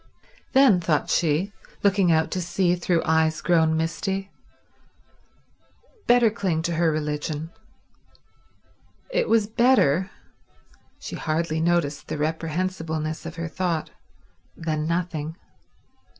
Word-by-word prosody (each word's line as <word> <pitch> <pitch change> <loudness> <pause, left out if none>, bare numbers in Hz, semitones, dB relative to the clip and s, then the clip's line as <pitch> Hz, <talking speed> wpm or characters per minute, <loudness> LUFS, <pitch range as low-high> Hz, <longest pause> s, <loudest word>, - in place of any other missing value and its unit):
Then, 265 -9 +6
thought 155 -3 0
she, 170 +5 +1 0.3
looking 195 -3 +3
out 160 0 +2
to 185 - -2
sea 175 +1 +1
through 175 -1 0
eyes 160 0 +2
grown 160 -2 +2
misty, 190 +4 -2 1.8
better 240 -2 +5
cling 180 -6 -1
to 170 - -1
her 165 0 +2
religion. 150 +1 -3 1.6
It - - 0
was 225 -2 +4
better—she 205 - -1
hardly 160 0 -1
noticed 165 -4 0
the - - -4
reprehensibleness 160 0 -2
of 165 - -8
her 165 0 -4
thought—than 155 - -5
nothing. 165 -2 -2
165 Hz, 100 wpm, -24 LUFS, 155-185 Hz, 1.8 s, Then